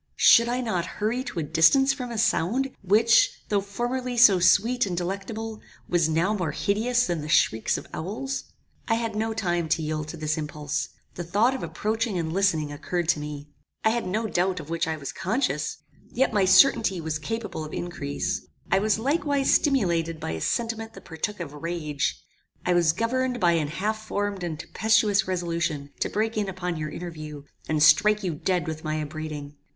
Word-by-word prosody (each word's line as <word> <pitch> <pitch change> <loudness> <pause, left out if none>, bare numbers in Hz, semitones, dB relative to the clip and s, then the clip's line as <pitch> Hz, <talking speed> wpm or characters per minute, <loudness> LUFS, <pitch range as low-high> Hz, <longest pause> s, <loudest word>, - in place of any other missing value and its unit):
Should 235 +1 +6
I 250 +1 0
not 185 -8 -1
hurry 225 +5 -1
to - - -7
a 165 - 0
distance 270 - +4
from 250 -2 -6
a 235 - -5
sound, 230 +4 +1
which, 220 +4 +4
though 205 -1 +2
formerly 245 +5 -3
so 205 -6 +7
sweet 225 +6 +3
and 175 -2 -3
delectable, 205 +5 -4 0.3
was 170 -2 +2
now 165 +6 +1
more 180 -8 -2
hideous 235 +7 +1
than 170 -3 -2
the 150 - -6
shrieks 110 -7 +2
of - - -8
owls? 230 +11 -4 0.4
"I 225 - +3
had 225 -2 -2
no 220 +1 -1
time 175 -6 -1
to 160 0 +1
yield 155 0 -3
to 165 - -7
this 155 0 -1
impulse. 150 0 -3 0.2
The 175 - -5
thought 205 +9 +2
of 265 - -4
approaching 220 -1 -2
and 160 -2 -2
listening 165 -6 +1
occurred 170 +3 -3
to 175 - +3
me. 150 0 -7 0.3
I 220 - +4
had 235 -4 -1
no 215 +5 -1
doubt 185 -3 0
of 155 0 -9
which 165 -1 0
I 160 -1 -2
was 140 -2 -6
conscious. 205 +9 -1 0.3
Yet 260 -1 +1
my 200 -3 +3
certainty 195 -2 +5
was 160 -1 -3
capable 225 -2 -4
of 155 - -8
increase. 150 -5 -3 0.2
I 190 - +5
was 210 0 +2
likewise 280 +2 +1
stimulated 170 - +1
by - - -4
a 80 -1 -4
sentiment 225 -1 -2
that - - -12
partook 185 +5 -4
of 160 -4 -6
rage. 150 -2 -2 0.5
I 180 - +3
was 170 -2 +4
governed 245 +6 -1
by 175 -2 +4
an 160 -3 +1
half 215 +7 -3
formed 205 -3 -2
and 160 -3 -4
tempestuous 210 0 +2
resolution 170 -5 -2
to - - 0
break 220 +1 -1
in 205 -2 0
upon 180 -2 -3
your 155 0 -3
interview, 155 -3 -7 0.3
and 155 -1 +2
strike 210 +7 +5
you 180 -3 -1
dead 175 +3 -1
with 155 0 -5
my 155 -1 -2
upbraiding. 150 -1 -6
185 Hz, 190 wpm, -25 LUFS, 160-225 Hz, 0.5 s, so